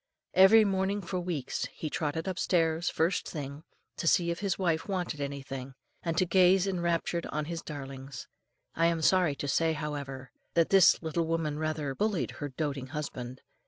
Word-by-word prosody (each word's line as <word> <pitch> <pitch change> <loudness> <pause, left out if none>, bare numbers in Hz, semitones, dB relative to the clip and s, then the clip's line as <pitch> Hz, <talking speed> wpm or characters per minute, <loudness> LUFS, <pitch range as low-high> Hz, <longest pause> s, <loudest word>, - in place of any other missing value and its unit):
Every 210 +4 +7
morning 195 +1 0
for 185 +1 -3
weeks 170 -7 -3
he 155 - -5
trotted 155 +2 -2
upstairs, 170 -2 +1
first 170 +4 0
thing, 140 -2 -6 0.4
to 165 - -2
see 170 +1 +3
if 170 - -4
his 200 -2 -1
wife 165 -4 0
wanted 180 -6 -2
anything, 135 -2 -5 0.3
and 165 -1 -2
to 185 - +4
gaze 185 +1 +4
enraptured 170 -2 -1
on 150 0 -3
his 165 +1 -4
darlings. 135 -3 -8 0.5
I 165 +1 +3
am 165 -1 0
sorry 180 -4 +4
to 145 - -4
say, 160 +3 +2
however, 140 -4 -5 0.2
that 165 -1 +3
this 190 -3 +6
little 160 +1 -1
woman 160 -2 -1
rather 155 -3 -2
bullied 185 - -1
her 145 - -2
doating 140 -1 -3
husband. 130 -3 -6
160 Hz, 165 wpm, -30 LUFS, 145-180 Hz, 0.5 s, Every